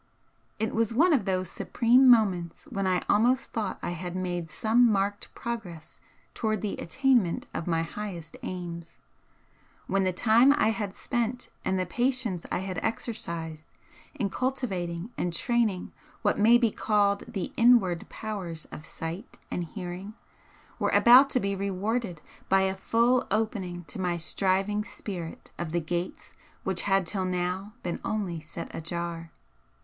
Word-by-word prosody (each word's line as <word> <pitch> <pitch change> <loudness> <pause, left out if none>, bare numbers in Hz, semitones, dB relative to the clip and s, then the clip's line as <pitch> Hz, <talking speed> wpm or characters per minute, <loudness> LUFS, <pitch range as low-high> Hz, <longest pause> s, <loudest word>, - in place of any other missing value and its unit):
It 220 - -1
was 225 0 +1
one 330 +6 +5
of 240 -9 +2
those 185 -2 0
supreme 250 +8 +4
moments 190 - +3
when 195 -4 -1
I 185 -1 +1
almost 245 +5 +3
thought 215 -5 -2
I - - -1
had 175 +1 -5
made 175 -3 -3
some 225 +7 +3
marked 200 0 -1
progress 220 -9 -6 0.3
towards 215 -2 -1
the 205 - -1
attainment 250 -4 +1
of 165 - -4
my 165 -1 +1
highest 170 -3 -6
aims, 170 -2 -6 0.9
when 195 0 +1
the 185 - +2
time 230 +8 +5
I 220 - +3
had 210 -3 -2
spent 240 0 -2
and 190 - 0
the 185 - 0
patience 240 -3 0
I - - 0
had 185 -3 -3
exercised 165 -9 -4 0.5
in 200 -6 -1
cultivating 195 -8 -2
and 175 - 0
training 220 0 0 0.3
what 205 - +2
may 230 +3 +7
be 235 -3 +2
called 205 -2 +2
the 200 -7 -4
INWARD 230 -8 +4
powers 185 -7 -5
of 150 - -9
sight 165 +7 -6
and 175 - -1
hearing 185 +4 -7 0.6
were - - +1
about 255 +4 +8
to 255 - +2
be 200 -3 -1
rewarded 200 -1 -2 0.3
by 195 0 +5
a 190 0 +1
full 235 +5 +2
opening 195 -5 -1
to 180 - -6
my 175 -1 0
striving 195 +4 +1
spirit 180 -6 -7
of 175 -2 -3
the 170 - +1
gates 175 +2 -4 0.3
which 190 -2 0
had 195 -1 +3
till 190 +1 -1
now 185 +3 -2
been 175 - -3
only 195 -6 -2
set 160 +2 -8
ajar. 170 0 -4
195 Hz, 150 wpm, -28 LUFS, 175-225 Hz, 0.9 s, about